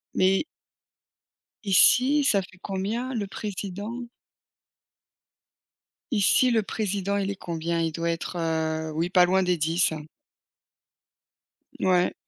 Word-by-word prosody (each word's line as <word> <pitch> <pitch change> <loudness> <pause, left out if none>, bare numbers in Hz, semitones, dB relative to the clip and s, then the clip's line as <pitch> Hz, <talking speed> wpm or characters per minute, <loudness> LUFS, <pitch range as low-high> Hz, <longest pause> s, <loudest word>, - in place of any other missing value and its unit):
Mais 190 +5 +3 1.2
Ici, 255 +9 +4
ça 200 -7 +3
fait 185 0 -14
combien 215 +7 -3
le 220 -4 -2
président? 205 +4 -5 2.1
Ici 240 +3 +3
le 225 -2 +2
président 200 -1 -2
il 200 0 -1
est - - -5
combien? 170 -1 -3
Il 165 - 0
doit 170 +2 -2
être, 170 +2 -3
heu, 160 -1 -1
oui 165 +3 -1
pas 180 -1 +5
loin 190 +2 +2
des 180 -1 +1
10, 165 +3 +1
hein. 155 -1 -6 1.8
Mouais. 180 -1 +2
190 Hz, 115 wpm, -26 LUFS, 170-205 Hz, 2.1 s, pas